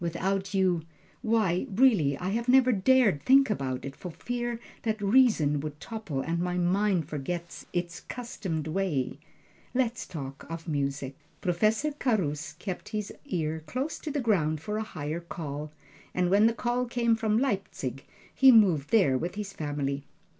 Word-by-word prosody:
Without 190 +3 -1
you 185 -3 +2 0.4
why, 220 -3 +1
really 195 - +4
I 180 - -3
have 235 +4 -1
never 255 0 +6
dared 210 - +4
think 270 -1 +5
about 130 -9 -2
it, 135 0 -6
for 180 - -7
fear 240 +6 -3 0.2
that 220 -1 -1
reason 200 - +4
would 150 0 -6
topple, 200 - -4
and 165 +4 -2
my 180 0 -1
mind 180 -2 +2
forget 170 +3 -5
its 175 -1 -3
'customed 190 -10 -5
way 160 -6 -1 0.6
let's 245 -2 0
talk 135 -4 -7
of 165 +1 -6
music. 140 -3 -2 0.2
Professor 215 - +1
Carus 185 - -1
kept 190 -3 -6
his 210 -2 -4
ear 160 -3 -2
close 265 - -3
to 310 - -5
the 290 -1 -1
ground 160 -10 +1
for 210 +7 -3
a - - -1
higher 155 -6 -4
call, 150 -3 -6 0.4
and 180 0 +1
when 205 +3 +6
the 230 - +2
call 245 +1 0
came 235 -1 +2
from 220 -2 +1
Leipzig, 195 - -2 0.3
he 265 -1 +7
moved 185 - +5
there 185 - +4
with 175 +6 -4
his 205 -2 -5
family. 145 -3 -3
185 Hz, 160 wpm, -28 LUFS, 155-225 Hz, 0.6 s, he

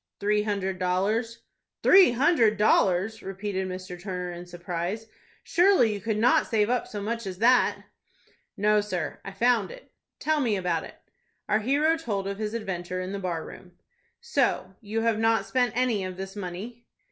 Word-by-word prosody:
"Three 210 +1 +2
hundred 195 -3 -2
dollars." 205 +6 -1 0.4
"Three 375 -9 +7
hundred 240 -5 +3
dollars!" 205 +1 +2
repeated 195 0 -4
Mr. 185 -1 -7
Turner, 180 -2 -4
in 175 0 -9
surprise. 175 +4 -4 0.4
"Surely 350 - +4
you 205 - -6
could 220 +1 -1
not 230 +3 +3
save 220 -1 +1
up 250 - 0
so 205 -1 -6
much 230 0 -3
as 185 -1 -5
that?" 245 +4 +3 0.7
"No, 210 +1 +3
sir, 185 -4 -4
I 195 - -7
found 235 +4 +2
it." - - -13 0.3
"Tell 310 0 0
me 230 -5 +1
about 180 -4 -1
it." - - -12 0.5
Our 215 - +2
hero 290 +8 +2
told 205 -11 -3
of 200 +1 -4
his 215 +1 -3
adventure 185 -4 -4
in 185 +1 -4
the 200 - -4
bar 175 -4 -3
room. 180 -1 -12 0.5
"So 275 - 0
you 220 +1 -2
have 225 -1 +1
not 225 0 +2
spent 245 -3 +1
any 245 -6 +1
of 185 -1 -6
this 190 +1 -7
money?" 205 +5 -7
210 Hz, 170 wpm, -26 LUFS, 185-230 Hz, 0.7 s, Three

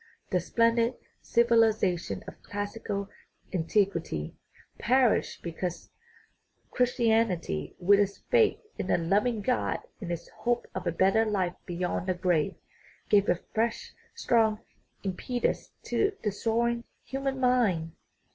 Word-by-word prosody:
The 180 - +3
splendid 230 +6 +2 0.3
civilization 225 -6 +2
of - - -10
classical 205 -1 -4 0.5
antiquity 170 - 0 0.5
perished 255 -1 +2
because 170 0 -5 0.8
Christianity, 225 - +1
with 200 +3 +5
its 200 -1 +1
faith 465 -3 +5 0.2
in 190 - -3
a - - +4
loving 205 +6 +1
God 250 +2 +1 0.2
and 180 -4 -5
its 170 0 -4
hope 240 0 -1
of 185 -1 -4
a - - +2
better 190 +6 +3
life 195 -5 0
beyond 180 +1 -2
the 185 - +1
grave, 175 0 +1 0.5
gave 205 -1 +4
a 175 - +2
fresh, 230 +1 -1 0.2
strong 220 -2 +2 0.4
impetus 210 +6 -2
to 410 -1 0
the 210 - +1
soaring 235 +3 0 0.2
human 270 0 -3
mind. 225 -11 +2
205 Hz, 120 wpm, -28 LUFS, 180-235 Hz, 0.8 s, with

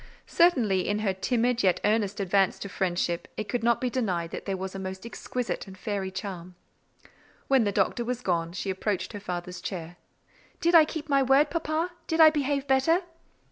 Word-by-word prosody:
Certainly, 235 - +3
in 205 - +1
her 195 - +2
timid 245 +4 0
yet 185 -2 +3
earnest 210 -1 +1
advance 195 0 +2
to 200 - -7
friendship, 175 -2 -1
it 215 - -3
could 245 - -2
not 235 0 +3
be 255 - -1
denied 185 -10 -1
that - - -6
there 195 -1 -1
was 190 0 -5
a 195 - -6
most 190 +1 -6
exquisite 240 -1 -4
and 190 -1 -11
fairy 195 -1 -3
charm. 185 -2 -7 0.9
When 265 -4 +4
the 205 - +1
Doctor 205 +4 +1
was 250 +1 -3
gone, 170 -5 -1
she 190 +1 -3
approached 195 +2 -2
her 205 - -5
father's 180 -2 -5
chair. 175 -2 -6 0.6
"Did 340 +1 +2
I 325 -2 +8
keep 310 0 -6
my 275 -2 +3
word, 270 +3 +4
papa? 330 +1 -1 0.2
Did 320 -1 -1
I 315 -1 +9
behave 285 -2 -1
better?" 280 +7 +3
210 Hz, 190 wpm, -27 LUFS, 190-270 Hz, 0.9 s, I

